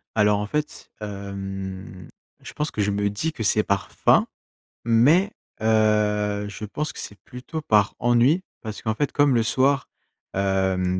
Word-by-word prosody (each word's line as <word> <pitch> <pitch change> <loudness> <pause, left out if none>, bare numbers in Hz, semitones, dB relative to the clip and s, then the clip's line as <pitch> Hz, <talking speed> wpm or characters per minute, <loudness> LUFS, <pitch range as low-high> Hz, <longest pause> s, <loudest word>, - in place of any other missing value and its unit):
Alors, 105 -1 +3
en 105 - -3
fait, 150 +5 -4
hem, 95 -2 -6 0.3
je - - -10
pense 150 +1 -2
que 105 - -2
je 100 - +1
me 100 0 0
dis 155 +11 -2
que 115 - -5
c'est 105 +1 +3
par 100 -1 -1
faim, - - +4 0.6
mais, 145 - +4 0.3
heu, 105 -2 +2
je 105 +1 -7
pense 150 +9 -4
que - - -9
c'est 100 - -8
plutôt 130 +5 -7
par 105 -7 +3
ennui. 120 +9 +3 0.2
Parce 110 -3 -6
qu'en 110 -1 -1
fait, 145 +4 -1
comme 145 -3 +3
le 115 - +3
soir, 135 +4 +2 0.5
hem, 95 -1 +1
105 Hz, 165 wpm, -24 LUFS, 100-125 Hz, 0.6 s, faim